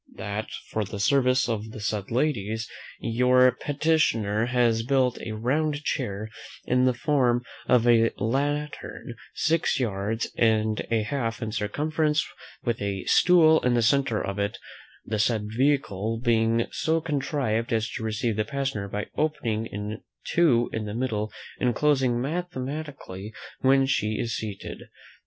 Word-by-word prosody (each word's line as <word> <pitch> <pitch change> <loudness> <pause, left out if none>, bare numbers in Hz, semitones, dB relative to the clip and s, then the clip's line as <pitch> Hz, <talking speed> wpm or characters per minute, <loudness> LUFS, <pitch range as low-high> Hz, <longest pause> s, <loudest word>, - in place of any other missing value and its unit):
"That 100 +2 -4 0.2
for 110 - 0
the 100 0 -6
service 130 +4 +3
of 110 -2 -2
the 110 - -9
said 105 -1 -2
ladies, 115 -4 -1 0.3
your 125 +2 +4
petitioner 125 -7 +1
has 120 -2 +2
built 130 0 +1
a 110 - -5
round 145 +7 0
chair, 110 -7 -3 0.3
in 125 +1 +3
the 130 -1 +2
form 125 -3 +2 0.2
of 120 -1 +4
a 115 -1 +5
lantern, 145 +5 -2 0.2
six 160 -2 +1
yards 110 -1 -2
and 110 -1 +2
a 115 -2 +1
half 115 -1 -2
in 110 - -3
circumference, 150 +8 0 0.4
with 120 -3 -1
a 100 -2 -2
stool 160 -3 +5
in 125 -1 +1
the 120 - +2
centre 120 -1 +2
of 100 +1 -4
it: 100 +1 -1 0.5
the 110 0 -2
said 105 -1 +1
vehicle 115 -4 0
being 115 -1 +2
so 160 +1 +1
contrived, 135 -7 -1
as 110 -1 +1
to - - -5
receive 110 0 -1
the 110 - +2
passenger 135 -4 -3
by 105 +1 -3
opening 125 -8 -1
in 105 +1 -5 0.2
two 130 -9 +3
in 110 -1 -2
the 105 0 -5
middle, 110 -4 -2 0.3
and 120 -2 +1
closing 130 -4 +2
mathematically 140 - -5 0.2
when 135 0 +4
she 110 -5 0
is 115 -1 -1
seated. 105 -3 -6
120 Hz, 145 wpm, -26 LUFS, 110-140 Hz, 0.5 s, a